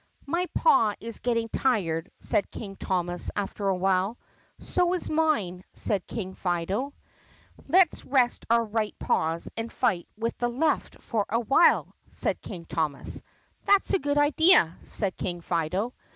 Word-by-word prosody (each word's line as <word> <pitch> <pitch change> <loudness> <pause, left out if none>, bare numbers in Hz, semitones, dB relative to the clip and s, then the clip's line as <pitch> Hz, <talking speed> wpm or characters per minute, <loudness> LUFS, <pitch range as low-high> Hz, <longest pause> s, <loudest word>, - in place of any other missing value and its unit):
"My 345 +5 -1
paw 225 - +4
is 230 0 -4
getting 230 -2 0
tired," 195 -10 0
said 200 - 0
King 195 -3 -8
Thomas 175 -2 -1
after 200 0 -3
a 190 - +2
while. 190 +4 +1 0.4
"So 360 0 0
is 360 - -4
mine," 225 - 0
said 200 -4 0
King 190 -4 -5
Fido. 190 +10 -2 0.7
"Let 365 -2 +5
's - - -8
rest 255 -3 +1
our 230 0 +3
right 215 -1 -2
paws 165 +1 -1
and 225 +1 -4
fight 205 -9 0
with 230 +1 -2
the 240 - +1
left 295 +6 -1
for 215 -4 -2
a 230 - +1
while," 270 +8 +3
said - - -3
King 175 -5 -8
Thomas. 155 -3 -1 0.5
"That 400 -1 +5
's - - -4
a 390 - +3
good 290 -1 -1
idea," 290 - +5
said 195 -4 +2
King 175 -2 -3
Fido. 180 +8 -2
220 Hz, 155 wpm, -27 LUFS, 185-270 Hz, 0.7 s, Let